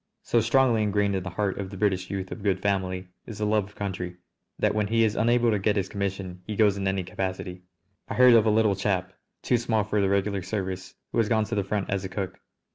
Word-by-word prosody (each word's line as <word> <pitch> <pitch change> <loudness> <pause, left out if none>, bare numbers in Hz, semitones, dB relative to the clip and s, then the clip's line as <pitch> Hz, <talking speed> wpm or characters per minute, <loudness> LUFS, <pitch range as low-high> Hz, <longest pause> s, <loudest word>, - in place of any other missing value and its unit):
So 120 - +2
strongly 120 -1 +3
ingrained 105 -1 +1
in 95 - -1
the 95 - -5
heart 100 +1 -2
of 95 -1 -4
the 95 - -8
British 95 -2 0
youth 95 -2 -4
of 115 - -6
good 95 -2 +1
family 95 -2 -1 0.2
is 110 - -7
the 105 - -1
love 105 -1 +2
of 105 - -17
country, 95 -3 -4 0.4
that - - +2
when 105 -1 0
he 115 +2 +3
is 110 -2 +1
unable 120 +1 +3
to 105 - +1
get 105 +2 +1
his 100 -2 -1
commission 95 -2 -4
he 105 - -3
goes 105 -2 +4
in 100 -1 -2
any 95 -1 0
capacity. 90 0 -4 0.5
I - - -3
heard 125 -1 +7
of 115 -1 +5
a - - +5
little 105 -2 +3
chap, 95 -1 -1 0.3
too 125 - +3
small 110 -2 +1
for 105 0 0
the 100 - +2
regular 100 0 +1
service, 95 -1 -4 0.2
who - - 0
has 110 -2 +2
gone 110 -1 +3
to 115 - -6
the 100 -2 +1
front 100 0 -2
as 100 -1 -1
a 95 - -4
cook! 95 -1 -4
100 Hz, 250 wpm, -26 LUFS, 95-110 Hz, 0.5 s, heard